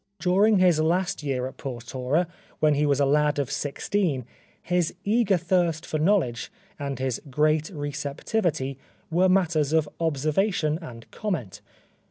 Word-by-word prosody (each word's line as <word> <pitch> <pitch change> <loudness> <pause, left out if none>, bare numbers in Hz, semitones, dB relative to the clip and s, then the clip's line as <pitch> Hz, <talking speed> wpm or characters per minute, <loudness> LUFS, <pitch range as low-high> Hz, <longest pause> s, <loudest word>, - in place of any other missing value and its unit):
'* - - -51
During 200 +4 +4
his 180 -4 +4
last 180 +4 +1
year 135 -4 -1
at 130 - -7
Portora, 130 +5 -2 0.3
when 155 -1 +4
he 145 +1 +2
was 140 -1 +2
a 140 - +4
lad 150 +1 +2
of 140 -3 -1
sixteen, 145 - -1 0.3
his 175 -2 0
eager 210 -2 +3
thirst 170 -2 0
for 155 - -2
knowledge 155 - +1 0.3
and 140 -2 -3
his 130 -2 -2
great 155 +3 +2
receptivity 145 -1 -2 0.3
were 180 +3 +3
matters 165 -6 +2
of 160 -2 +3
observation 160 +2 0
and 115 -8 -10
comment. 165 - -4
155 Hz, 145 wpm, -25 LUFS, 140-180 Hz, 0.3 s, During